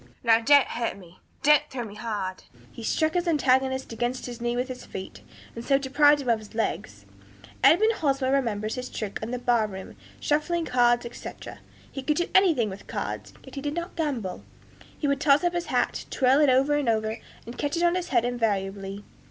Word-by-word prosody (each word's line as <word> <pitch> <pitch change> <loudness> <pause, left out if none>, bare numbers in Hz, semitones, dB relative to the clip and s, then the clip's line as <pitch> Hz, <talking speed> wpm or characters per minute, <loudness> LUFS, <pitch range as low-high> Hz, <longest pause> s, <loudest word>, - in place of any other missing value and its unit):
'Now, 225 -1 +5
don't 285 +3 +6
hurt 230 -4 -3
me, 180 -2 -16 0.2
don't 300 0 +6
throw 255 -3 -4
me 210 -3 -9
hard.' 210 -4 -4 0.3
He - - -10
struck 315 +7 0
his 355 0 0
antagonist 265 -5 +1
inside 240 +3 -2
his 240 -1 -7
knees 240 0 -1
with 250 +1 -1
his 255 -1 -7
feet, 190 - -8 0.3
and 230 - -6
so 275 +2 +3
deprived 290 +2 +4
him 250 - -3
of 230 -2 +3
his 215 +1 -14
legs. 105 - -3 0.6
Edmund 360 - +6
Hosmer 275 -7 0
remembers 220 -6 0
his 250 0 -5
tricks 210 -3 -5
in 220 - -4
the 250 - -2
bar 240 -3 +2
room, 190 -2 -9 0.2
shuffling 325 +3 0
cards, 240 -2 +3
etc.; 235 - -9 0.3
he 270 - -5
could 300 +3 0
do 345 - 0
anything 330 - +4
with 200 0 -9
cards, - - -5
yet - - -13
he 275 - -5
did 290 +1 -3
not 345 0 -5
gamble. 260 - -3 0.5
He 295 - -1
would 280 0 0
toss 290 +2 +4
up 350 0 +1
his 345 0 -2
hat, - - 0
twirling 270 +2 +4
it - - +5
over 270 +3 +3
and 290 -4 +1
over, 220 0 0 0.3
and 235 - -8
catch 290 +3 -1
it 340 - 0
on 345 0 +4
his 360 -1 -2
head 240 -3 +2
invariably. 200 -4 -2
250 Hz, 205 wpm, -26 LUFS, 225-290 Hz, 0.6 s, don't